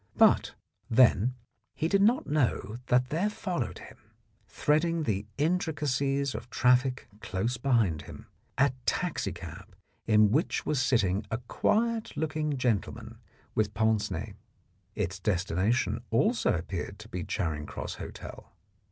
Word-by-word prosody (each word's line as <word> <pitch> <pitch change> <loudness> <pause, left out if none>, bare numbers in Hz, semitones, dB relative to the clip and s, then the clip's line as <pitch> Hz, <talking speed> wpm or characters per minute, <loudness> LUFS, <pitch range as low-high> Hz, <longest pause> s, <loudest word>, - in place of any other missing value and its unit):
But, - - +4 0.3
then, 125 0 +4 0.4
he 160 - 0
did 195 +3 +3
not 230 +5 +4
know 125 -7 0
that 125 +1 +3
there 175 +7 +1
followed 155 - -3
him, - - -13 0.5
threading 160 +2 +1
the 105 -5 -1
intri 160 +2 +1
cacies 140 -2 0
of 115 +3 -7
traffic 125 +1 +2
close 110 +5 -2
behind 115 - +2
him, - - -11 0.3
a 140 -1 +3
taxicab - - -3 0.3
in 105 -2 +5
which 155 +8 +1
was 145 -3 +1
sitting 105 -6 +2
a 110 - -1
quiet 220 - 0
looking 150 -2 -1
gentleman 120 -6 -2 0.3
with 105 -1 0
pince 110 0 +2
nez. - - -5 0.6
Its 95 +3 -2
destination 100 +4 0
also 215 - +2
appeared 80 - -4
to - - -11
be 90 -1 -4
Charing 80 -7 -2
Cross - - -5
Hotel. - - -9
125 Hz, 130 wpm, -29 LUFS, 105-150 Hz, 0.6 s, in